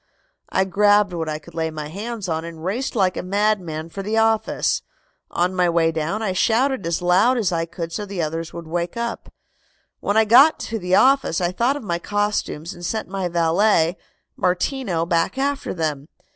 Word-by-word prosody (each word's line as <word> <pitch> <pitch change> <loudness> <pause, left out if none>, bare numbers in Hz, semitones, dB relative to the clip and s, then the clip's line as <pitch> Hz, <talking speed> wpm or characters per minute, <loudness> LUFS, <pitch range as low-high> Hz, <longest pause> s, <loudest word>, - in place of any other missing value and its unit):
I 190 - +2
grabbed 205 +1 +3
what 165 -2 -3
I 155 - -2
could 155 +2 -15
lay 160 0 -1
my 155 -1 -6
hands 210 +3 -5
on 160 -1 -2
and 165 -1 -8
raced 240 +9 -2
like 190 -4 +2
a - - -2
madman 185 -5 -1
for 195 - -6
the 215 +3 -2
office. 225 -1 +1 0.5
On 180 +2 0
the 180 -1 +2
way 165 -1 +2
down 165 +7 -2
I 195 -4 0
shouted 235 +2 +1
as 170 +1 -1
loud 195 +9 +4
as 215 -6 +1
I 165 -1 -1
could 165 -1 -6
so 210 - -3
the 195 -2 -6
others 165 +1 -3
would 170 -1 -8
wake 170 +4 -3
up. 235 0 -4 0.7
"When 205 - 0
I 220 - +5
got 270 +9 +7
to 225 -1 -4
the 180 0 +1
office 270 -9 +4
I 175 -1 0
thought 240 +9 +1
of 285 - -9
my 170 -4 -2
costumes 205 -4 -2
and 175 - -12
sent 220 +4 -3
my 190 -1 -2
valet, 170 +1 +2 0.4
Martino, 180 -1 0
back 170 +7 0
after 280 +1 -1
them. 150 -4 -3
185 Hz, 195 wpm, -22 LUFS, 165-215 Hz, 0.7 s, got